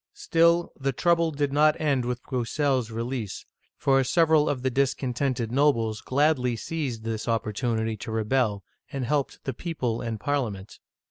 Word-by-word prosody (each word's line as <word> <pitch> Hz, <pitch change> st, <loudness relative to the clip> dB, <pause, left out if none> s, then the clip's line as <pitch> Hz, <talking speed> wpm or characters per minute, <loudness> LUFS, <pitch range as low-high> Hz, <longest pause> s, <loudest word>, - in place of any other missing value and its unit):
" -, -, -65 dB
Still, 170 Hz, +1 st, +2 dB
the 135 Hz, -1 st, -2 dB
trouble 170 Hz, +4 st, +2 dB
did 145 Hz, -2 st, -1 dB
not 150 Hz, +1 st, +4 dB
end 140 Hz, -5 st, +1 dB
with 125 Hz, 0 st, -3 dB
BrousseFs 130 Hz, -1 st, 0 dB
release, 115 Hz, -2 st, -4 dB, 0.3 s
for 135 Hz, -1 st, +3 dB
several 155 Hz, +2 st, +3 dB
of 130 Hz, -3 st, -2 dB
the 130 Hz, -, +1 dB
discontented 130 Hz, -2 st, 0 dB
nobles 115 Hz, -6 st, +2 dB
gladly 130 Hz, -3 st, +1 dB
seized 130 Hz, -4 st, -4 dB
this 110 Hz, 0 st, -3 dB
oppor 110 Hz, -2 st, 0 dB
tunity 110 Hz, -2 st, -1 dB
to 110 Hz, -, -6 dB
rebel, 110 Hz, -2 st, 0 dB, 0.3 s
and 135 Hz, -2 st, -3 dB
helped 140 Hz, +2 st, -1 dB
the 135 Hz, -, -3 dB
people 125 Hz, -6 st, -3 dB
and 115 Hz, -3 st, -4 dB
Parliament. 110 Hz, -7 st, -3 dB
130 Hz, 155 wpm, -26 LUFS, 115-145 Hz, 0.3 s, not